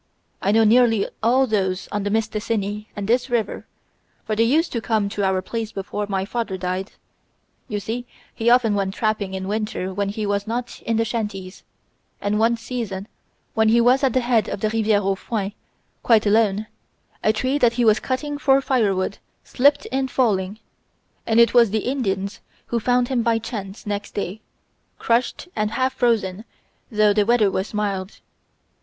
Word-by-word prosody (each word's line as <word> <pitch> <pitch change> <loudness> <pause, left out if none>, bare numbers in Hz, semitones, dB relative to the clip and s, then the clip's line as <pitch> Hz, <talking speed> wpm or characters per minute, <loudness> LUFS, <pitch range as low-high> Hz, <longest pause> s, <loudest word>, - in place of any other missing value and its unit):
I 200 - +2
know 225 +1 +5
nearly 225 -1 +4
all 250 +4 +4
those 195 -5 -1
on 205 - -1
the 205 - -2
Mistassini 215 -1 -2
and 205 -2 -4
this 245 +3 +1
river, 235 -3 -2 0.6
for 215 - -1
they 220 - +1
used 295 +9 +3
to 235 - -2
come 215 -3 0
to 200 0 -3
our 190 -1 +1
place 225 +1 -4
before 205 +1 -4
my 190 -1 -1
father 225 -3 -3
died. 185 +2 -3 0.7
You 210 - -3
see 240 +4 -5 0.3
he 230 0 +1
often 240 -3 +4
went 195 -1 -1
trapping 215 -3 -1
in 190 0 -4
winter 210 -3 -2
when 200 +1 -1
he 210 +1 -3
was 205 +1 -1
not 240 +2 -4
in 225 -1 +1
the 225 - +2
shanties, 210 -5 -4 0.6
and 205 +1 0
one 230 +1 +3
season 225 -5 -5 0.5
when 220 0 +3
he 235 +2 +5
was 250 +4 +4
at 265 -4 +3
the 255 - +2
head 240 -2 +1
of 195 - -4
the 215 - 0
Riviere 215 -2 +2
aux 195 0 +2
Foins, 200 0 -3 0.5
quite 225 -2 +4
alone, 210 0 +2 0.6
a 215 - +4
tree 255 +6 0
that 235 -3 +4
he 240 0 +1
was 215 -1 +5
cutting 290 +3 -3
for 270 -2 +4
firewood 210 -8 0 0.2
slipped 285 +3 +2
in 265 0 0
falling, 205 -6 0 0.7
and 225 0 +3
it 235 - +5
was 235 -3 +6
the 215 +1 -1
Indians 200 -7 -2 0.2
who 235 - -1
found 245 +2 +1
him 255 -3 +1
by 230 0 +2
chance 210 -3 -6
next 205 0 -4
day, 200 +1 -4 0.6
crushed 235 +7 0
and 215 -1 0
half 255 +3 0
frozen 220 -6 0 0.5
though 210 -1 +4
the 210 0 +3
weather 215 -2 +3
was 190 +2 -2
mild. 200 -2 -3
220 Hz, 180 wpm, -22 LUFS, 200-235 Hz, 0.7 s, was